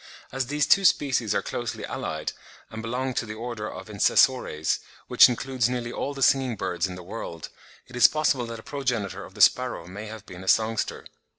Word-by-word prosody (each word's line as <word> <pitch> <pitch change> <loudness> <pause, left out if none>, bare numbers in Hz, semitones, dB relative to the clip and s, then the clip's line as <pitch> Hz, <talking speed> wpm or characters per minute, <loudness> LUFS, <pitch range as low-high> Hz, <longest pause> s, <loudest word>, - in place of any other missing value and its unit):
As 130 -1 -2
these 145 +2 +1
two 195 - +5
species 130 - +2
are 100 - 0
closely 120 -2 -4
allied, 80 -1 -4 0.4
and 110 - -6
belong 125 +3 -2
to 120 - -1
the 110 - -6
order 115 -2 -5
of - - -9
Insessores, 105 -5 +2 0.3
which - - +7
includes 125 -1 -1
nearly 120 -2 -3
all 140 +3 -4
the 135 - -1
singing 130 -3 +3
birds 90 -2 -2
in 90 - -7
the 90 - -9
world, 85 -4 -7 0.4
it 125 - -13
is 125 - +8
possible 150 -5 0
that 115 -1 -7
a - - -12
progenitor 115 -9 -3
of - - -15
the 105 - -4
sparrow 125 -1 +3
may 100 +4 -8
have 110 -1 -9
been 90 -1 -10
a - - -12
songster. 110 +1 +1
115 Hz, 200 wpm, -26 LUFS, 100-130 Hz, 0.4 s, is